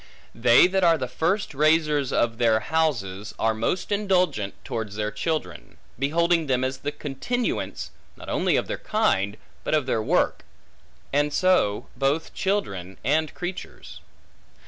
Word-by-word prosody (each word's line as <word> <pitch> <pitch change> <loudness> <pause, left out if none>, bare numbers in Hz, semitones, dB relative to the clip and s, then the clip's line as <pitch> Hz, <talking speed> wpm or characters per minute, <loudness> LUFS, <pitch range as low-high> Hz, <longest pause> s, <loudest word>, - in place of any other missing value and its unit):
They 120 +4 +6
that 190 +1 +1
are 165 -2 +5
the 130 -3 -3
first 175 - -1
raisers 150 -1 +2
of 115 -1 0
their 115 -2 +4
houses, 110 -9 -1
are 110 0 +1
most 115 - -2
indulgent 185 - +1
towards 110 -5 -4
their 105 0 -2
children; 110 - -4 0.2
beholding 165 +3 +2
them 130 -1 +1
as 130 0 -2
the 145 - -3
continuance, 150 - -3 0.3
not - - -11
only - - +1
of - - +1
their - - -4
kind, 105 - 0 0.3
but - - +1
of 150 -3 +1
their 115 -4 0
work; - - +1 0.7
and 145 +1 +2
so 185 - +2
both 140 +4 0
children 100 - -2
and 155 +2 +1
creatures. 180 +1 -7
145 Hz, 145 wpm, -25 LUFS, 115-170 Hz, 0.7 s, They